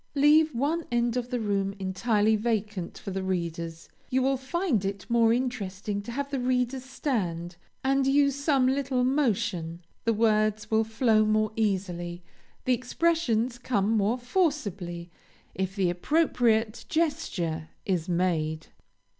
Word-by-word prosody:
Leave 300 Hz, +2 st, +5 dB
one 300 Hz, +7 st, 0 dB
end 240 Hz, 0 st, +1 dB
of 250 Hz, -1 st, -2 dB
the 250 Hz, -1 st, -1 dB
room 200 Hz, -2 st, -1 dB
entirely 210 Hz, +3 st, +1 dB
vacant 210 Hz, -4 st, -2 dB
for 195 Hz, -, -6 dB
the 190 Hz, 0 st, -2 dB
readers. 170 Hz, -3 st, -3 dB, 0.2 s
You 260 Hz, 0 st, +2 dB
will 270 Hz, +1 st, +2 dB
find 265 Hz, -, -1 dB
it 195 Hz, 0 st, -4 dB
more 230 Hz, -1 st, +4 dB
interesting 210 Hz, -5 st, -2 dB
to 235 Hz, -, -7 dB
have 280 Hz, +3 st, -3 dB
the 275 Hz, -, -1 dB
readers 250 Hz, +1 st, 0 dB
stand, 185 Hz, -, -3 dB, 0.3 s
and 270 Hz, 0 st, +2 dB
use 280 Hz, 0 st, +3 dB
some 280 Hz, -2 st, +2 dB
little 260 Hz, -1 st, +1 dB
motion; 190 Hz, -, 0 dB, 0.2 s
the 230 Hz, -, +2 dB
words 215 Hz, -1 st, +1 dB
will 220 Hz, 0 st, +4 dB
flow 220 Hz, -1 st, +3 dB
more 215 Hz, 0 st, +2 dB
easily, 180 Hz, -5 st, -2 dB, 0.4 s
the 255 Hz, -, +3 dB
expressions 250 Hz, -3 st, 0 dB
come 215 Hz, -4 st, 0 dB
more 220 Hz, +2 st, +2 dB
forcibly 205 Hz, -, -2 dB, 0.4 s
if 190 Hz, 0 st, -3 dB
the 190 Hz, -4 st, +2 dB
appropriate 230 Hz, -, +1 dB
gesture 185 Hz, -, -1 dB, 0.2 s
is 180 Hz, -3 st, -1 dB
made. 160 Hz, -3 st, 0 dB
220 Hz, 140 wpm, -27 LUFS, 190-260 Hz, 0.4 s, Leave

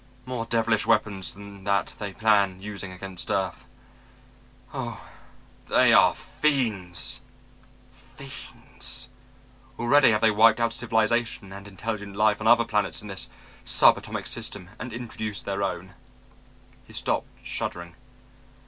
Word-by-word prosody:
More 125 Hz, -3 st, -4 dB
devilish 115 Hz, -1 st, +1 dB
weapons 100 Hz, -3 st, +1 dB
than 100 Hz, -1 st, -11 dB
that 100 Hz, -4 st, +1 dB
they 105 Hz, -1 st, -4 dB
plan 100 Hz, -2 st, +2 dB
using 100 Hz, -1 st, -6 dB
against 90 Hz, 0 st, -7 dB
earth. 95 Hz, -3 st, -1 dB, 1.1 s
Oh, -, -, -5 dB, 0.6 s
they -, -, +5 dB
are -, -, +6 dB
fiends, 110 Hz, -, 0 dB, 0.7 s
fiends! -, -, -6 dB, 0.7 s
Already 135 Hz, +4 st, +5 dB
have 110 Hz, -1 st, +2 dB
they 110 Hz, -1 st, +5 dB
wiped 110 Hz, +2 st, +5 dB
out 115 Hz, 0 st, +1 dB
civilization 115 Hz, -3 st, 0 dB
and 100 Hz, +1 st, -9 dB
intelligent 100 Hz, 0 st, -5 dB
life 105 Hz, 0 st, +3 dB
on 110 Hz, -, 0 dB
other 120 Hz, 0 st, +6 dB
planets 105 Hz, -3 st, -1 dB
in 105 Hz, -, -8 dB
this 95 Hz, -, -3 dB, 0.3 s
sub -, -, +6 dB
atomic -, -, -6 dB
system 90 Hz, 0 st, -4 dB
and 125 Hz, -, -6 dB
introduced 110 Hz, -3 st, -5 dB
their 100 Hz, 0 st, -2 dB
own." 95 Hz, -1 st, -3 dB, 0.9 s
He -, -, -16 dB
stopped, -, -, -1 dB, 0.2 s
shuddering. 85 Hz, -1 st, -4 dB
105 Hz, 125 wpm, -26 LUFS, 100-115 Hz, 1.1 s, are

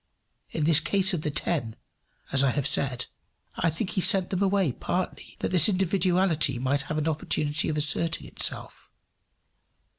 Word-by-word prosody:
In 155 Hz, -, -3 dB
this 155 Hz, 0 st, +5 dB
case 190 Hz, +4 st, 0 dB
of 170 Hz, -, -2 dB
the 150 Hz, -, -2 dB
ten, 145 Hz, -6 st, -2 dB, 0.6 s
as 135 Hz, 0 st, +5 dB
I 135 Hz, -, +3 dB
have 140 Hz, +1 st, -2 dB
said, 135 Hz, -3 st, 0 dB, 0.5 s
I 165 Hz, -, +1 dB
think 165 Hz, +5 st, -3 dB
he 190 Hz, -, -1 dB
sent 190 Hz, -2 st, +3 dB
them 190 Hz, 0 st, -1 dB
away, 195 Hz, -6 st, +2 dB
partly, 180 Hz, +8 st, -4 dB
that -, -, -1 dB
this 180 Hz, +3 st, +5 dB
individuality 185 Hz, -6 st, +1 dB
might 130 Hz, +3 st, 0 dB
have 155 Hz, -, -2 dB
an 155 Hz, 0 st, -1 dB
opportunity 150 Hz, -1 st, -1 dB
of 155 Hz, -, -2 dB
asserting 160 Hz, +2 st, +1 dB
itself. -, -, -4 dB
160 Hz, 160 wpm, -26 LUFS, 145-185 Hz, 0.6 s, this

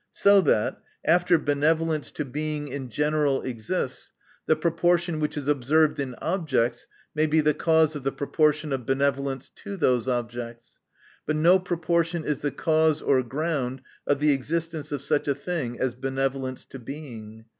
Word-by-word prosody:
So 200 Hz, 0 st, +5 dB
that, 115 Hz, -, +1 dB, 0.2 s
after 175 Hz, +2 st, +4 dB
benevolence 155 Hz, +1 st, +1 dB
to 150 Hz, -, -4 dB
Being 150 Hz, +2 st, -3 dB
in 135 Hz, -1 st, -5 dB
general 150 Hz, +1 st, +1 dB
exists, 115 Hz, -4 st, -3 dB, 0.4 s
the 155 Hz, -, +4 dB
proportion 170 Hz, 0 st, +1 dB
which 150 Hz, 0 st, -2 dB
is 145 Hz, -2 st, -4 dB
observed 150 Hz, +3 st, +2 dB
in 130 Hz, -3 st, -3 dB
objects, 140 Hz, -9 st, -1 dB, 0.3 s
may 155 Hz, +1 st, +2 dB
be 155 Hz, +1 st, +3 dB
the 150 Hz, 0 st, +3 dB
cause 160 Hz, 0 st, +3 dB
of 145 Hz, -, -4 dB
the 135 Hz, -, 0 dB
proportion 150 Hz, +1 st, +1 dB
of 125 Hz, -4 st, -4 dB
benevolence 135 Hz, -1 st, 0 dB
to 200 Hz, -2 st, -7 dB
those 125 Hz, -7 st, +2 dB
objects: 120 Hz, -1 st, -4 dB, 0.5 s
but 155 Hz, -, +1 dB
no 170 Hz, +5 st, +5 dB
proportion 170 Hz, -2 st, -1 dB
is 150 Hz, -3 st, -1 dB
the 145 Hz, -, 0 dB
cause 155 Hz, 0 st, +2 dB
or 135 Hz, -2 st, +3 dB
ground 130 Hz, -1 st, -2 dB, 0.2 s
of 145 Hz, -, +3 dB
the 150 Hz, 0 st, +4 dB
existence 155 Hz, +2 st, -2 dB
of 140 Hz, -2 st, -3 dB
such 145 Hz, +1 st, 0 dB
a 140 Hz, -, +1 dB
thing 140 Hz, -5 st, -4 dB
as 130 Hz, -2 st, 0 dB
benevolence 135 Hz, 0 st, -3 dB
to 135 Hz, -, -10 dB
Being. 115 Hz, -5 st, -9 dB
145 Hz, 160 wpm, -26 LUFS, 130-160 Hz, 0.5 s, So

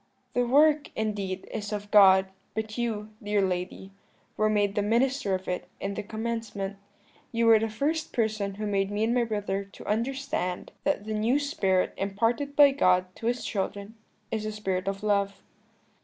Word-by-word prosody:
"'The 245 Hz, -1 st, +1 dB
work, 295 Hz, +3 st, +4 dB
indeed, 200 Hz, -3 st, -3 dB
is 210 Hz, -1 st, -4 dB
of 205 Hz, 0 st, -5 dB
God; 190 Hz, -2 st, +7 dB, 0.3 s
but 220 Hz, 0 st, -3 dB
you, 220 Hz, -3 st, -2 dB
dear 210 Hz, -1 st, 0 dB
lady, 185 Hz, 0 st, -2 dB, 0.4 s
were 215 Hz, 0 st, +2 dB
made 205 Hz, -2 st, +2 dB
the 205 Hz, -, +1 dB
minister 230 Hz, -1 st, +1 dB
of 185 Hz, 0 st, -6 dB
it 180 Hz, 0 st, -3 dB
in 200 Hz, 0 st, -3 dB
the -, -, -3 dB
commencement. 220 Hz, -2 st, -4 dB, 0.5 s
You 230 Hz, 0 st, +1 dB
were 225 Hz, -1 st, +7 dB
the 225 Hz, +1 st, -1 dB
first 300 Hz, +8 st, -1 dB
person 215 Hz, -4 st, -1 dB
who 215 Hz, +1 st, -4 dB
made 195 Hz, -1 st, 0 dB
me 205 Hz, +1 st, -1 dB
and 230 Hz, +2 st, +2 dB
my 245 Hz, -1 st, +2 dB
brother 205 Hz, -3 st, -2 dB
to 195 Hz, -, -14 dB
understand 230 Hz, -5 st, -2 dB
that 290 Hz, -8 st, 0 dB
the 215 Hz, -, -3 dB
new 220 Hz, +5 st, +2 dB
spirit 200 Hz, -, +1 dB
imparted 230 Hz, +8 st, -1 dB
by 285 Hz, -1 st, +8 dB
God 185 Hz, -8 st, +2 dB
to 225 Hz, -, -4 dB
His 245 Hz, +1 st, -1 dB
children 200 Hz, 0 st, -3 dB, 0.4 s
is 220 Hz, -1 st, -1 dB
the 215 Hz, -, -2 dB
spirit 195 Hz, -3 st, -2 dB
of 195 Hz, +1 st, -3 dB
love.' 200 Hz, -1 st, 0 dB
210 Hz, 175 wpm, -27 LUFS, 195-230 Hz, 0.5 s, by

